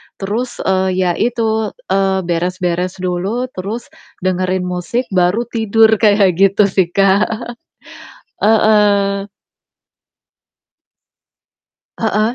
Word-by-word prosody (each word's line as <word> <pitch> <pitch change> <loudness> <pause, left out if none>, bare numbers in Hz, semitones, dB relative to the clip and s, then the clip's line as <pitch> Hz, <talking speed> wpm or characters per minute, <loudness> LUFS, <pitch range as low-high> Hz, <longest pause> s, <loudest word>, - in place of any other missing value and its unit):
terus, 230 +5 -4
eee, 190 0 +1
ya 185 -1 +1
itu, 220 -2 -1 0.2
eee, 195 -1 +1
beres-beres 180 +1 -2
dulu, 195 +8 -2
terus 205 +5 -6 0.3
dengerin 185 0 0
musik, 180 +7 -2
baru 185 +4 +2
tidur, 225 -1 +3
kayak 200 -5 +3
gitu 195 +1 +4
sih, 190 -3 +2
Kak. 195 +1 +3 1.1
Heeh. 205 -2 +2 2.7
Heeh, 220 +1 0
195 Hz, 90 wpm, -16 LUFS, 185-220 Hz, 2.7 s, gitu